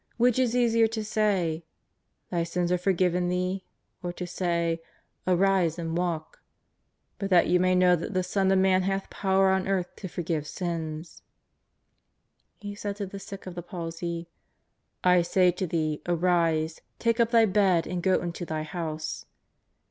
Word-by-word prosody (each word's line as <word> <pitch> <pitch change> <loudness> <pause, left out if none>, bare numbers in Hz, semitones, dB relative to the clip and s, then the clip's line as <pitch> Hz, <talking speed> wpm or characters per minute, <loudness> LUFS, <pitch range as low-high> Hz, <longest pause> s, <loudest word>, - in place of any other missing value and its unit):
Which 245 +1 +3
is 245 -2 +2
easier 230 -2 +4
to 220 -1 -4
say: 195 -7 0 0.7
Thy 175 -2 +1
sins 175 +1 -1
are 180 - +3
forgiven 180 -1 +1
thee, 180 +1 -1 0.4
or 175 - -3
to 180 - -5
say: 170 -2 -1 0.5
Arise 185 -2 +3
and 165 -1 -3
walk? 170 -3 -3 0.8
But 195 - -2
that 180 -3 +5
you 180 +1 +3
may 185 0 +3
know 180 0 +5
tliat 170 - -4
the 185 0 +1
Son 190 +1 +1
of 190 - +4
Man 190 0 +4
hath 195 +1 -2
power 190 -1 +2
on 190 0 +1
earth 185 -2 -1
to 190 - -6
forgive 165 -4 -3
sins 165 -2 -5 0.5
" - - -48
— - - -46
He 205 0 -5
said 205 0 -4
to 205 -1 -4
the 195 +1 -8
sick 195 0 -9
of 185 - -6
the 175 - -5
palsy: 170 -1 -5 0.4
" - - -50 0.3
I 180 -1 +5
say 180 +1 +3
to 180 +1 -3
thee, 155 -2 -1
arise, 165 -2 +1 0.2
take 230 0 +1
up 230 -1 +4
thy 230 -1 +5
bed 190 -4 +3
and 180 +1 -3
go 185 0 +2
into 175 0 -4
thy 155 -2 -3
house." 155 -2 -5
180 Hz, 175 wpm, -27 LUFS, 170-195 Hz, 0.8 s, that